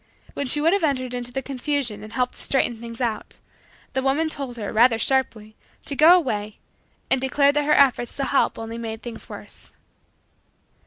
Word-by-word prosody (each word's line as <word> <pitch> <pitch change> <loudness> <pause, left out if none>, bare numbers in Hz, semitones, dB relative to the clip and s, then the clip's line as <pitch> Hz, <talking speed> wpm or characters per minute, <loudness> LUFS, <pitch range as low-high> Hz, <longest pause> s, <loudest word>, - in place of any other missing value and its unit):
When 280 - -3
she 295 - +3
would 325 +4 +3
have 400 -3 +1
entered 255 -4 0
into 245 0 -4
the 270 +2 -3
confusion 265 -4 -2
and 215 - -10
helped 250 -1 0
to - - -9
straighten 240 -4 0
things 230 +1 -8
out, 230 -3 -3 0.6
the 265 - 0
woman 280 +4 +1
told 270 -5 -6
her, 210 -3 -5
rather 230 +1 +5
sharply, 225 -3 -1 0.3
to 280 - -4
go 325 +5 +7
away, 215 - -3 0.5
and 260 - +3
declared 280 +2 +3
that 295 - +1
her 300 - +3
efforts 255 -4 +3
to 275 - -1
help 275 - +1
only 225 +1 -6
made 225 -1 -6
things 240 -2 -8
worse. - - -10
255 Hz, 190 wpm, -23 LUFS, 230-280 Hz, 0.6 s, go